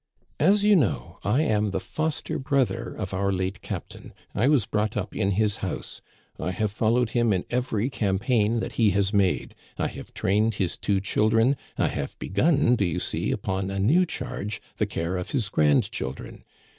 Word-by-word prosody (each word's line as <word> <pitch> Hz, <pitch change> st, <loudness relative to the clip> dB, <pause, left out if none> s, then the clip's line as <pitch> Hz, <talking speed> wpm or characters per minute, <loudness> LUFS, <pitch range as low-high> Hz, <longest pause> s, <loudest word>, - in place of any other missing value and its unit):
" -, -, -40 dB
As 205 Hz, 0 st, +4 dB
you 210 Hz, -1 st, +6 dB
know, 100 Hz, -, 0 dB
I 145 Hz, +5 st, +2 dB
am 105 Hz, -6 st, +1 dB
the 95 Hz, 0 st, -1 dB
foster 155 Hz, +11 st, -2 dB
brother 130 Hz, -3 st, 0 dB
of 95 Hz, -3 st, -5 dB
our 100 Hz, +1 st, +1 dB
late 95 Hz, +1 st, -2 dB
captain; -, -, -7 dB, 0.2 s
I 120 Hz, -, +2 dB
was 140 Hz, -8 st, +4 dB
brought 105 Hz, +1 st, -1 dB
up -, -, -4 dB
in 100 Hz, -3 st, +1 dB
his 105 Hz, +1 st, +1 dB
house; 95 Hz, -, -5 dB, 0.4 s
I -, -, -2 dB
have 100 Hz, +3 st, -1 dB
followed 115 Hz, +2 st, +1 dB
him 120 Hz, -2 st, +2 dB
in 95 Hz, -3 st, 0 dB
every 120 Hz, -2 st, 0 dB
campaign 110 Hz, +2 st, +1 dB
that -, -, -4 dB
he 110 Hz, -, +6 dB
has 100 Hz, +1 st, +1 dB
made; 100 Hz, -3 st, +1 dB, 0.2 s
I -, -, 0 dB
have -, -, -10 dB
trained 105 Hz, +3 st, +1 dB
his 95 Hz, -3 st, -1 dB
two 100 Hz, -2 st, 0 dB
children; 115 Hz, +6 st, +3 dB, 0.2 s
I -, -, +2 dB
have 70 Hz, -, -4 dB
begun, 125 Hz, -, +2 dB
do 100 Hz, -, +1 dB
you 85 Hz, -4 st, 0 dB
see, -, -, -2 dB
upon 95 Hz, 0 st, -2 dB
a 100 Hz, -, -3 dB
new 155 Hz, -, +3 dB
charge, 105 Hz, -8 st, -4 dB, 0.2 s
the -, -, +1 dB
care 85 Hz, +3 st, -2 dB
of 90 Hz, -, -4 dB
his 120 Hz, -8 st, -1 dB
grandchildren. 70 Hz, -3 st, 0 dB
105 Hz, 185 wpm, -26 LUFS, 95-120 Hz, 0.4 s, you